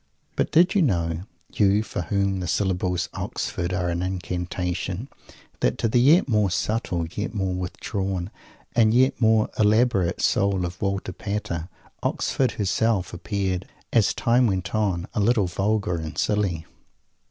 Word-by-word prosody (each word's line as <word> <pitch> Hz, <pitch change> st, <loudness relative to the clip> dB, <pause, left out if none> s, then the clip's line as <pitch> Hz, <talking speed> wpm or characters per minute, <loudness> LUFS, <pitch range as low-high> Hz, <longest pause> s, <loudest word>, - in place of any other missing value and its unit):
But -, -, 0 dB
did 175 Hz, +3 st, +5 dB
you 200 Hz, -, +3 dB
know, 85 Hz, -, 0 dB, 0.3 s
you 100 Hz, +1 st, +3 dB
for 110 Hz, -, -4 dB
whom 100 Hz, +1 st, 0 dB
the 90 Hz, -, -3 dB
syllables 90 Hz, -1 st, 0 dB
"Oxford" 85 Hz, 0 st, -3 dB
are 90 Hz, -1 st, -1 dB
an 85 Hz, 0 st, -1 dB
Incantation, 90 Hz, +3 st, -3 dB, 0.5 s
that -, -, +1 dB
to 115 Hz, -, +1 dB
the 120 Hz, +2 st, +3 dB
yet 150 Hz, +7 st, +5 dB
more 105 Hz, -5 st, +2 dB
subtle, 90 Hz, -3 st, -1 dB
yet 105 Hz, +2 st, -4 dB
more 95 Hz, -2 st, -1 dB
withdrawn, 95 Hz, +1 st, -3 dB, 0.4 s
and 115 Hz, -1 st, +4 dB
yet 130 Hz, +1 st, +3 dB
more 110 Hz, -1 st, +3 dB
elaborate 105 Hz, -4 st, +3 dB
soul 100 Hz, -5 st, +2 dB
of 90 Hz, 0 st, -7 dB
Walter 100 Hz, -2 st, -2 dB
Pater, 95 Hz, -4 st, -4 dB, 0.3 s
Oxford 130 Hz, -2 st, 0 dB
Herself 105 Hz, -1 st, 0 dB
appeared, 95 Hz, 0 st, -2 dB, 0.3 s
as 115 Hz, -4 st, +3 dB
time 120 Hz, +1 st, +3 dB
went 95 Hz, -4 st, -2 dB
on, 100 Hz, -4 st, 0 dB
a -, -, -1 dB
little 105 Hz, -1 st, +3 dB
vulgar 95 Hz, 0 st, 0 dB
and 80 Hz, -2 st, -6 dB
silly? 95 Hz, -6 st, 0 dB
100 Hz, 145 wpm, -24 LUFS, 90-110 Hz, 0.5 s, did